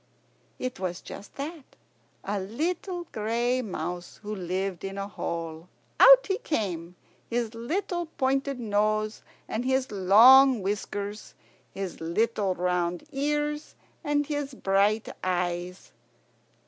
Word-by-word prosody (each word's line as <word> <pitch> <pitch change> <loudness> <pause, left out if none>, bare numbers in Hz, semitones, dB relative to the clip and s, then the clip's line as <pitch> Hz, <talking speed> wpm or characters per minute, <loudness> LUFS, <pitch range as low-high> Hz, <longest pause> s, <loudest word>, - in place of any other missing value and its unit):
It 255 -5 -4
was 180 -1 -3
just 200 - -10
that, 295 +1 -7 0.5
a 205 +1 -2
little 340 - -3
gray 235 +4 0
mouse 180 -5 -5
who 210 +1 -4
lived 185 -1 -3
in 195 0 -5
a 200 0 -3
hole. 165 -3 -5 0.3
Out - - +9
he 390 +1 -1
came, 180 - -3 0.3
his 235 -1 -1
little 345 - -2
pointed 270 -2 -1
nose 215 0 0 0.3
and 220 +2 -2
his 260 -1 0
long 225 +5 +7
whiskers, 205 +1 -4 0.4
his 195 -3 -6
little 195 +3 0
round 180 -1 0
ears 295 +1 -1 0.3
and 290 -1 +1
his 290 -2 -3
bright 200 +1 +2 0.2
eyes. 180 0 -2
215 Hz, 115 wpm, -27 LUFS, 185-270 Hz, 0.5 s, Out